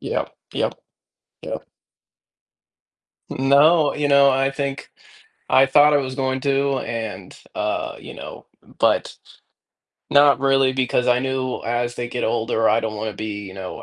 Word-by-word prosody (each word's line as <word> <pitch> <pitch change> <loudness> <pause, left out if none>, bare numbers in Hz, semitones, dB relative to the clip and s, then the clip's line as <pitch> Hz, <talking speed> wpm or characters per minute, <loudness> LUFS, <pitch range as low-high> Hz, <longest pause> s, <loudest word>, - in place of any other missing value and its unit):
Yep, - - -3 0.2
yep. - - -1 0.7
Yep. - - -6 1.7
N 135 +1 -2
no, 150 +2 +5
you 150 -1 -1
know, 140 -1 +5
I 135 +1 +1
think 135 -1 -5 0.6
I 135 +1 +5
thought 145 +2 +5
I - - +5
was 130 -2 -4
going 130 -1 -1
to 140 0 0
and, 110 -5 -6 0.2
uh, - - -3
you - - -11
know - - -10 0.3
but - - +1 1.0
not 145 -1 +5
really 135 -1 +3
because 125 -1 0
I 125 0 +3
knew 130 -1 -2
as 120 +1 -2
they 120 0 -4
get 125 0 -5
older, 115 0 0
I 110 - +3
don't 110 -1 -4
want 110 +1 -3
to 100 - -12
be, 105 -1 -5
you 95 - -10
know, 95 +4 -7
130 Hz, 155 wpm, -21 LUFS, 115-140 Hz, 1.7 s, no